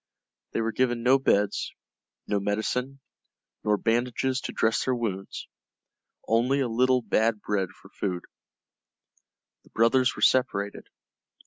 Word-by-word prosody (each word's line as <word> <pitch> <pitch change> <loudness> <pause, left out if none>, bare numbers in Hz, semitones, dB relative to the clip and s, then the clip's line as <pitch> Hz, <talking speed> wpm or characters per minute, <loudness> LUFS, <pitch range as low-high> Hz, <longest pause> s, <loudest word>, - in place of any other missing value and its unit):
They - - 0
were 115 0 -1
given 120 -1 0
no 130 +2 +5
beds, 105 -6 +1 0.5
no 100 - 0
medicine, 125 +7 -2 0.6
nor 105 -1 +2
bandages 125 +4 0
to - - -5
dress 110 0 +1
their 130 - 0
wounds, 100 -5 -4 0.8
only 125 +5 +2
a 135 - +1
little 125 +2 +2
bad 110 -1 +1
bread 100 -3 -1
for - - -18
food. 90 -3 -3 1.4
The - - -22
brothers 125 +3 +3
were - - -4
separated. 100 -6 +1
115 Hz, 125 wpm, -27 LUFS, 105-130 Hz, 1.4 s, no